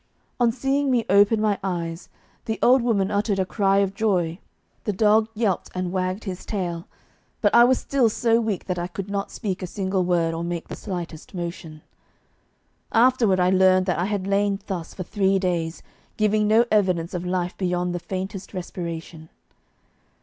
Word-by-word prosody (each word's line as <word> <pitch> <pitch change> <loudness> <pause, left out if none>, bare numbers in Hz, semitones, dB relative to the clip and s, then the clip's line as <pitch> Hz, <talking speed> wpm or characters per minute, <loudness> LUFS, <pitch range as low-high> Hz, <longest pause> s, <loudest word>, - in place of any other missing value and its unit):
On 240 -1 +4
seeing 270 +3 0
me 240 -4 +2
open 205 +2 +5
my 210 -2 +1
eyes, 170 -3 -4 0.4
the 220 - -2
old 255 +1 +6
woman 210 -5 +1
uttered 205 0 0
a 190 - +1
cry 195 0 +1
of 195 - -7
joy, 185 -5 0 0.4
the 210 - -1
dog 215 +2 +3
yelped 210 -5 0
and 180 -1 -2
wagged 185 +2 -2
his 190 -3 -6
tail, 175 -5 -4 0.5
but 205 - +2
I 235 0 +8
was 255 +1 +3
still 265 -5 +1
so 230 +1 +2
weak 215 -5 -2
that 180 -2 -2
I 175 - -2
could 185 +3 -6
not 200 0 -2
speak 195 -5 -4
a 185 - -3
single 190 0 -1
word 170 -2 +1
or 165 +1 -3
make 170 -1 -4
the - - -5
slightest 175 -3 -7
motion. 170 -3 -6 1.1
Afterward 230 -5 +4
I 180 0 +3
learned 185 0 +4
that 180 -3 0
I 175 - +1
had 200 -2 -2
lain 200 0 +1
thus 175 -4 -5
for 185 - -4
three 195 +1 +1
days, 175 -3 -2 0.3
giving 215 0 +2
no 225 +3 +5
evidence 185 -5 +1
of 175 -1 -3
life 180 0 -2
beyond 180 -1 -1
the 175 - -2
faintest 190 +2 -6
respiration. 170 -3 -6
190 Hz, 180 wpm, -24 LUFS, 175-215 Hz, 1.1 s, I